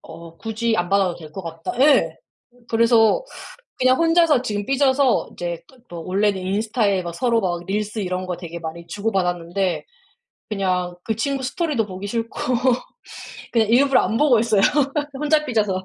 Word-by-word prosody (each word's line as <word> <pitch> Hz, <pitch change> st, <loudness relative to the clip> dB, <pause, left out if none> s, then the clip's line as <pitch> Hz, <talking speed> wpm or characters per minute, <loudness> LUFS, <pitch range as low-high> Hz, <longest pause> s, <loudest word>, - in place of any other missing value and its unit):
어. 165 Hz, 0 st, -12 dB
굳이 225 Hz, +2 st, -1 dB
안 175 Hz, 0 st, -1 dB
받아도 195 Hz, -2 st, +2 dB
될 155 Hz, -2 st, -11 dB
것 190 Hz, -, -7 dB
같다. 165 Hz, 0 st, -6 dB
예. 260 Hz, -, +4 dB, 0.5 s
그래서 230 Hz, -, +3 dB, 0.6 s
그냥 255 Hz, 0 st, +4 dB
혼자서 330 Hz, -4 st, +4 dB
지금 210 Hz, -5 st, -3 dB
삐져서 270 Hz, -1 st, +2 dB
이제 175 Hz, -1 st, -5 dB
또 260 Hz, -, -20 dB
또 170 Hz, -2 st, -8 dB
원래는 200 Hz, +1 st, +1 dB
인스타에 200 Hz, 0 st, 0 dB
막 170 Hz, -, -5 dB
서로 235 Hz, +2 st, +1 dB
막 175 Hz, -3 st, -2 dB
릴스 210 Hz, +3 st, -2 dB
이런 185 Hz, -2 st, -3 dB
거 180 Hz, -1 st, -4 dB
되게 170 Hz, -1 st, -7 dB
많이 165 Hz, +1 st, -7 dB
주고 205 Hz, +6 st, -2 dB
받았는데 180 Hz, 0 st, -1 dB, 0.6 s
그냥 185 Hz, -4 st, -1 dB
그 220 Hz, -, -2 dB
친구 270 Hz, +4 st, -1 dB
스토리도 275 Hz, -, -1 dB
보기 190 Hz, 0 st, -7 dB
싫고 230 Hz, +2 st, -4 dB, 1.1 s
그냥 225 Hz, -3 st, +2 dB
일부러 270 Hz, +3 st, +4 dB
안 225 Hz, -, -1 dB
보고 275 Hz, -6 st, +4 dB
있어요 220 Hz, -3 st, +2 dB, 0.5 s
혼자 300 Hz, +2 st, +1 dB
삐져서. 210 Hz, -8 st, 0 dB
210 Hz, 320 characters per minute, -21 LUFS, 180-245 Hz, 1.1 s, 예